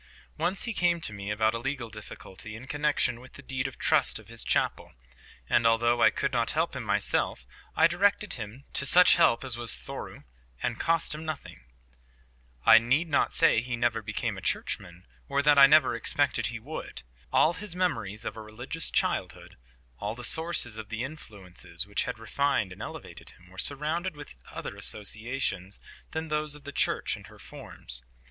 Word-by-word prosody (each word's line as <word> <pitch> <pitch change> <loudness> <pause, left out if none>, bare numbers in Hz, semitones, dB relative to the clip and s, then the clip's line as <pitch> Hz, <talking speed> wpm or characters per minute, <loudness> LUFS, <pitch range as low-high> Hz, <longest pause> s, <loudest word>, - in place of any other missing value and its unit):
Once 185 - -1
he 235 - -3
came 175 -3 +2
to 135 - -3
me 100 0 -6
about 110 +1 +2
a 115 - -2
legal 135 -1 -3
difficulty 105 -1 -10
in 115 +3 -9
connexion 145 -4 +1
with 130 - -14
the 140 - -12
deed 130 0 -2
of 135 - -9
trust - - +2
of - - -13
his - - -5
chapel; - - 0 0.5
and 115 - +4
although 120 +1 +3
I - - +8
could - - -2
not - - +1
help - - 0
him - - -3
myself, 65 - 0 0.3
I 160 - +5
directed 200 +4 +2
him 120 +4 -6
to 140 - +1
such 180 +4 +7
help 115 - +4
as 130 -3 0
was 120 - -1
thorough - - -8 0.4
and - - -1
cost 165 -1 +1
him 155 +1 -6
nothing. 150 - -7 1.0
I 115 0 +9
need 135 +9 +1
not 145 - +2
say 165 -9 +4
he 125 0 -3
never 115 -1 +1
became 110 -1 -3
a - - -12
churchman, 85 +1 -3 0.2
or 140 - +1
that 145 -1 +6
I 135 - +11
never 150 -4 +5
expected 140 +3 +1
he 120 - -4
would. 145 +8 -7 0.3
All 160 - +4
his 195 -1 -3
memories 115 - -1
of - - -4
a 110 - -7
religious 120 +9 -4
childhood, - - -1 0.4
all 105 +2 -3
the 125 - -9
sources 160 -7 +1
of 110 -1 -7
the 115 +1 -3
influences 100 - -5
which 100 0 -1
had - - -4
refined 125 -2 0
and - - -12
elevated - - -7
him, 90 0 -16
were 95 - -10
surrounded 155 - +1
with 145 - -10 0.2
other - - -6
associations 105 -3 -3 0.3
than 160 0 -4
those 150 -1 0
of 150 - -12
the 145 - -7
Church - - 0
and - - -12
her - - -15
forms. - - 0
125 Hz, 185 wpm, -28 LUFS, 110-150 Hz, 1.0 s, I